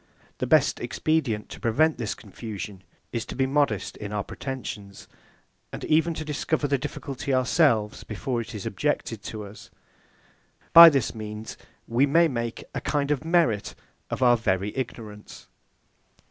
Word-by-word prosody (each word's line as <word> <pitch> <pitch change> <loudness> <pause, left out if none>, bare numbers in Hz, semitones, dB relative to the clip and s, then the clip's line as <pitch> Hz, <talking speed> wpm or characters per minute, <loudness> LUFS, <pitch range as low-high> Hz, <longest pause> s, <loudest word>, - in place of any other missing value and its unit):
The - - -1
best - - +3
expedient 140 -10 -1
to - - -9
prevent 150 +7 +2
this 115 -4 -2
confusion, 105 -3 -8 0.3
is 115 -2 -2
to - - -7
be 135 +1 +2
modest 140 +1 0
in 105 -1 -6
our 105 -1 -2
pretensions; 110 -7 -7 0.6
and - - -7
even 160 +1 +2
to 155 - -5
discover 150 0 -1
the 140 -1 +1
difficulty 135 +1 -5
ourselves 130 -4 +2
before 120 +3 -3
it 115 0 -8
is 100 - -6
objected 115 -2 -2
to 110 -1 -5
us. 100 +1 -12 1.0
By 170 0 +13
this 135 -6 0
means, 110 0 -7 0.3
we 125 +5 +3
may 165 +4 +5
make 120 -5 -4
a - - -3
kind 145 -1 0
of 145 -2 0
merit 160 - +1 0.3
of - - -2
our 120 -1 +6
very 100 -2 -1
ignorance. 110 -5 -7
120 Hz, 150 wpm, -26 LUFS, 105-145 Hz, 1.0 s, By